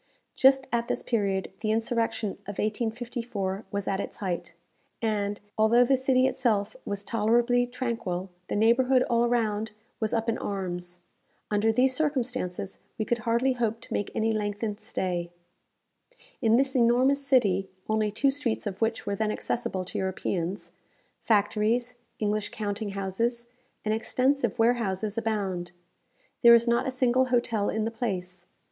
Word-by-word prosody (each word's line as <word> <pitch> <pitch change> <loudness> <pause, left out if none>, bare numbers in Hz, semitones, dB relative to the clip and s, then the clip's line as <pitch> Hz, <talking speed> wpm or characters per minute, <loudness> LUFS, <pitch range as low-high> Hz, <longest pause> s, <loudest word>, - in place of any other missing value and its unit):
Just 265 0 +5
at 235 0 0
this - - -2
period 200 -4 0
the 215 - -2
insurrection 225 -1 0 0.2
of 205 - -6
1854 225 -2 -2
was 200 0 -3
at 195 - 0
its - - -4
height, 175 -3 -4 0.4
and, 205 -3 -1 0.2
although 230 +3 +6
the 270 - +4
city 260 0 +3
itself 225 -6 +1
was 200 0 -3
tolerably 235 +3 +2
tranquil, 230 -7 -3 0.2
the - - -2
neighbourhood 250 +4 +4
all 235 0 +4
around 220 -3 0 0.3
was 220 -2 -1
up 225 0 0
in 230 - 0
arms. 180 -3 -4 0.5
Under 210 +2 +3
these 255 +3 +3
circumstances, 250 - -2 0.2
we 215 - -1
could 240 +1 0
hardly 235 +4 +1
hope 230 -2 -1
to - - -7
make 205 - -1
any 220 0 +1
lengthened 210 0 -2
stay. 180 -5 -2 1.1
In 225 -2 +4
this 270 +2 +2
enormous 255 +4 +4
city 205 -9 +2 0.2
(only 215 -1 +1
two 270 +7 +2
streets 270 -6 -1
of 200 0 -5
which 225 0 0
were 200 - -1
then 215 +1 0
accessible 190 -5 -2
to - - -4
Europeans), 190 -1 -2 0.5
factories, 220 +3 +1 0.2
English 210 0 -1
counting 205 -1 -4
houses, 230 +5 -1 0.4
and 215 - +1
extensive 255 +1 +1
warehouses 220 -3 +1
abound. 200 -6 -2 0.7
There 235 0 +9
is 235 +1 +3
not 235 +2 +2
a - - +1
single 255 0 +2
hotel 235 -4 +1
in 220 0 -1
the 225 - -2
place. 180 -6 -4
225 Hz, 150 wpm, -27 LUFS, 200-240 Hz, 1.1 s, There